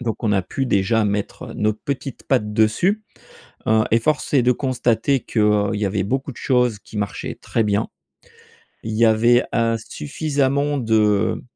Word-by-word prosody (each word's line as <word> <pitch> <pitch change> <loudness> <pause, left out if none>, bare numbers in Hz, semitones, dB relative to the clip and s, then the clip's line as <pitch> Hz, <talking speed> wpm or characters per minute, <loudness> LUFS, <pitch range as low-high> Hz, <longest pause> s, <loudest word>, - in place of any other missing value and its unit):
Donc 115 -1 -4
on 105 - +2
a 95 -2 +2
pu 135 +8 -3
déjà 105 +2 +2
mettre 105 0 -3
nos 110 0 +1
petites 135 +3 -6
pattes 105 -6 0
dessus, 170 - +2 0.7
heu, 110 0 +4
et 115 - +4
force 150 +4 -1
est 130 -4 +4
de 125 - +4
constater 125 0 0
qu'il 105 -3 +1
y 105 0 -1
avait 95 -1 -1
beaucoup 135 +6 -2
de - - -14
choses 125 -5 +1
qui 105 - -10
marchaient 100 -2 -4
très 115 - -1
bien. 105 +1 0 0.9
Il 110 - -5
y 115 +2 +3
avait, 120 +2 +4
heu, 115 0 +2
suffisamment 140 - -1
de 110 -3 +1
115 Hz, 165 wpm, -21 LUFS, 105-130 Hz, 0.9 s, heu